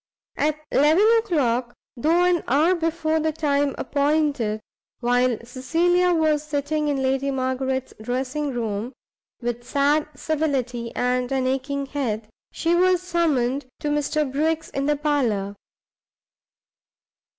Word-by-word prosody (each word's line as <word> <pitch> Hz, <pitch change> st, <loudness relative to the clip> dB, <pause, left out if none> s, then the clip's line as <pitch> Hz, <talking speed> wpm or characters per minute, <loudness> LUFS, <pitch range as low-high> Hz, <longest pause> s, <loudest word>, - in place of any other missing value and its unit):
At 305 Hz, 0 st, 0 dB
eleven 310 Hz, +8 st, +4 dB
o'clock, 255 Hz, -, 0 dB, 0.2 s
though 325 Hz, +8 st, +2 dB
an 355 Hz, -1 st, +2 dB
hour 305 Hz, +8 st, +4 dB
before 325 Hz, -2 st, 0 dB
the 315 Hz, 0 st, 0 dB
time 285 Hz, -3 st, 0 dB
appointed, 285 Hz, -6 st, 0 dB, 0.4 s
while 245 Hz, -1 st, +2 dB
Cecilia 335 Hz, +9 st, +1 dB
was 310 Hz, -3 st, +2 dB
sitting 300 Hz, 0 st, -2 dB
in 280 Hz, -2 st, 0 dB
Lady 270 Hz, +1 st, +1 dB
Margaret's 260 Hz, 0 st, -2 dB
dressing 260 Hz, +5 st, -2 dB
room, 230 Hz, 0 st, -3 dB, 0.5 s
"with 240 Hz, 0 st, -3 dB
sad 285 Hz, +4 st, +1 dB
civility 260 Hz, -6 st, -2 dB
and 250 Hz, 0 st, 0 dB
an 265 Hz, -1 st, 0 dB
aching 270 Hz, +2 st, -1 dB
head," 230 Hz, -7 st, -3 dB, 0.2 s
she 335 Hz, +1 st, 0 dB
was 365 Hz, 0 st, +3 dB
summoned 290 Hz, -7 st, 0 dB
to 295 Hz, -, -1 dB
Mr 295 Hz, 0 st, 0 dB
Briggs 315 Hz, +3 st, -1 dB
in 275 Hz, +1 st, -2 dB
the 295 Hz, -, +3 dB
parlour. 245 Hz, -10 st, 0 dB
280 Hz, 120 wpm, -23 LUFS, 255-310 Hz, 0.5 s, eleven